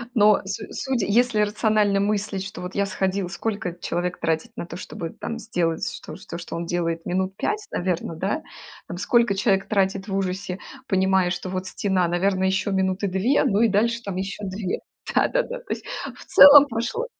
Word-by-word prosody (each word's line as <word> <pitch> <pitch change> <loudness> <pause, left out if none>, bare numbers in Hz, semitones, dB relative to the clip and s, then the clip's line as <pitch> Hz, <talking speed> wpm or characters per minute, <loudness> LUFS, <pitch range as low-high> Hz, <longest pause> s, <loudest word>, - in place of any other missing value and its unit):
но 210 -1 +5
су 205 +3 -4
судя, 260 -7 -1
если 225 +1 +3
рационально 210 -1 +2
мыслить, 200 -1 -1
что 195 - -8
вот 180 +1 -6
я 200 0 +1
сходил, 190 -1 -1
сколько 195 -3 -3
человек 175 +1 -2
тратит 160 -1 -1
на - - -5
то, - - -9
чтобы 165 -2 -6
там 230 - -6
сделать 170 -8 -1
что, - - -7
то, 170 - -8
что 170 - -7
он 170 0 -3
делает 165 -1 -2
минут 190 +1 -1
5, 425 0 -2
наверно, 175 -2 -2
да? 200 - -2 0.5
Там 175 - -6
сколько 210 +1 +2
человек 195 -1 +1
тратит 195 -1 0
в 195 - -3
ужасе, 185 -1 -2 0.3
понимая, 190 -1 +2
что 185 +1 -4
вот 185 0 -3
стена, 185 -3 0
наверное, 185 +2 +1
ещё 190 +2 0
минуты 190 +1 0
2, 195 +9 +2
ну 205 +2 +2
и 230 - +5
дальше 230 +3 +1
там 200 -4 -5
ещё 195 +2 -4
2. 190 0 -3 0.3
Да-да-да. - - +1
То - - -20
есть - - -8 0.3
в - - -13
целом 285 0 +9
прошло 240 - -2
195 Hz, 185 wpm, -24 LUFS, 185-215 Hz, 0.5 s, целом